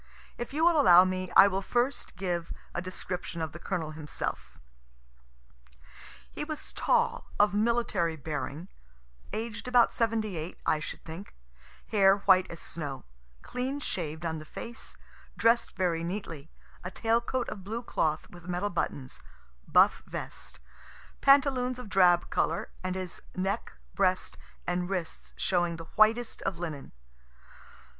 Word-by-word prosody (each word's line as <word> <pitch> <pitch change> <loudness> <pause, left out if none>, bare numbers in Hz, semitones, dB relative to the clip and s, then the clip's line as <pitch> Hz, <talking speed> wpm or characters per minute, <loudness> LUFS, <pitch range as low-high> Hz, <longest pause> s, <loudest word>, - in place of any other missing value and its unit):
If 240 - -5
you 310 +4 +2
will 335 -3 +6
allow 180 -1 +8
me, 185 -1 -2
I 195 - +10
will 195 0 -1
first 245 +6 -1
give 175 -2 -2 0.2
a 175 - -2
description 180 -1 -5
of 160 -2 -2
the 170 - -9
Colonel 160 -2 -3
himself. 155 -1 -5 1.7
He - - -4
was 305 0 -6
tall, 475 -1 +1
of 205 0 +5
military 210 -6 +1
bearing, 150 +2 -4 0.6
aged 225 +3 -4
about 245 -1 +5
78, 215 -8 -1
I 155 - +3
should 155 - -7
think, 165 +5 -9 0.5
hair 195 -3 +5
white 185 -1 +6
as 170 - -8
snow, 145 - -6 0.4
clean 260 +3 -3
shaved 165 - -4
on 160 -1 -2
the - - -8
face, 230 +9 -6 0.4
dress'd 230 +1 +3
very 175 -3 0
neatly, 170 -5 -5 0.3
a 180 - -4
tail 225 +4 +1
coat 250 +1 -2
of 195 - -7
blue 225 +5 -4
cloth 155 -8 0
with 175 0 -13
metal 180 +3 -1
buttons, 140 -6 -3 0.5
buff - - +5
vest, - - -7 0.6
pantaloons 265 -3 +4
of 250 -4 -8
drab 180 -3 +4
color, 165 - 0
and 185 0 -2
his 185 -2 -5
neck, 190 - -2 0.2
breast 185 0 +1 0.3
and 180 0 -1
wrists 180 -4 -4
showing 175 -2 +1
the 165 0 -8
whitest 225 +2 +3
of 195 -3 -2
linen. 160 -5 -5
185 Hz, 140 wpm, -29 LUFS, 170-230 Hz, 1.7 s, I